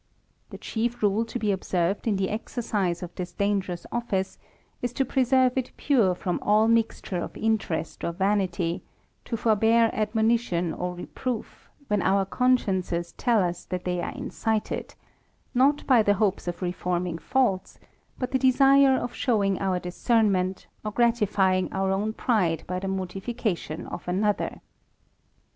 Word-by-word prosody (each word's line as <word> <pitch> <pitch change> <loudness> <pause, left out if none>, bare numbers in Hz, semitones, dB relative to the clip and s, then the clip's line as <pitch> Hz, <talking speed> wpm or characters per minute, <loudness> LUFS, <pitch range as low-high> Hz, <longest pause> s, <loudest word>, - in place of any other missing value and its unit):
The - - -8
chief 235 +1 -3
rule 205 +2 +3
to 230 - -5
be 215 -3 0
observed 190 +1 -1
in 215 - +2
the 190 0 -1
exercise 210 -5 -2
of 175 - -7
this 180 -1 -6
dangerous 195 -4 -1
office, 205 -6 -2 0.4
is 245 0 -2
to 270 - 0
preserve 255 -1 +3
it 255 - -5
pure 225 -11 +3
from 180 0 -2
all 215 +2 +4
mixture 225 -5 +1
of - - -6
interest 215 -7 -1
or - - 0
vanity; 185 -2 0 0.4
to 230 - -3
forbear 225 +1 +3
admonition 220 -5 +1
or 180 0 -4
reproof, 235 +6 -5 0.2
when 210 -2 +1
our 195 +1 +2
consciences 190 -8 0
tell 235 -6 +2
us 175 0 -3
that 180 -1 -4
they 180 -1 -1
are - - -3
incited, 220 -2 -3 0.6
not 275 +3 +3
by 250 -4 +5
the 205 -1 +3
hopes 200 -3 0
of 175 +1 -4
reforming 175 -1 -2
faults, 245 -7 0 0.4
but 255 - -3
the 260 - +2
desire 270 +1 +5
of 245 - -3
show 225 -6 +1
ing 195 -1 +1
our 190 -2 0
discernment, 190 0 +1 0.2
or 215 - -2
gratifying 205 -5 +2
our 190 0 0
own 205 +3 0
pride 185 - 0
by 180 0 -3
the 195 - -4
mortification 190 -2 -3
of - - -8
another. 205 +3 0
205 Hz, 150 wpm, -26 LUFS, 180-235 Hz, 0.6 s, by